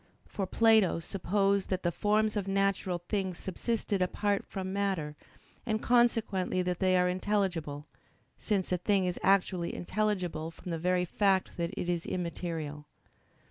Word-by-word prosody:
For 195 -2 -4
Plato 220 -5 +4
supposed 195 +3 0
that 185 -1 -1
the 175 - +1
forms 215 +4 +1
of 200 -2 -2
natural 195 -2 0
things 190 -4 -1
subsisted 200 +1 -2
apart 200 +2 0
from 190 -1 -4
matter, 190 -7 -1 0.5
and 220 -2 -1
consequently 225 -7 +2
that 180 -1 -2
they 185 -1 +3
are 180 0 +3
intelligible: 180 -6 -1 0.5
since 195 -4 -1
a 180 - +2
thing 195 +1 +2
is 180 -1 -2
actually 185 -3 +2
intelligible 185 -5 -1
from 170 +2 -9
the 165 - -2
very 180 +1 +1
fact 190 +1 +1
that 170 -1 -1
it - - -2
is 175 -1 -1
immaterial. 165 -4 -4
185 Hz, 145 wpm, -30 LUFS, 175-200 Hz, 0.5 s, Plato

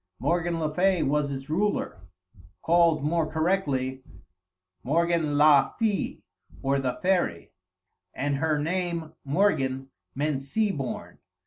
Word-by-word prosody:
Morgan 170 +5 0
le 155 -1 -2
Fay 185 +1 +2
was 145 0 0
its 135 0 -6
ruler 170 - -1 0.6
(called 165 -3 +3
more 160 +1 0
correctly 145 -6 0 0.8
Morgan 160 - +1
la 150 -2 +5
fée, 215 -3 -1 0.4
or 135 0 +1
the 130 -2 -2
fairy), 180 - 0 0.6
and 140 +4 -1
her 155 +1 +1
name 165 0 -2
Morgan 135 -5 0 0.2
meant 145 0 -1
sea 210 +10 0
born. 135 -7 -5
155 Hz, 115 wpm, -26 LUFS, 135-175 Hz, 0.8 s, la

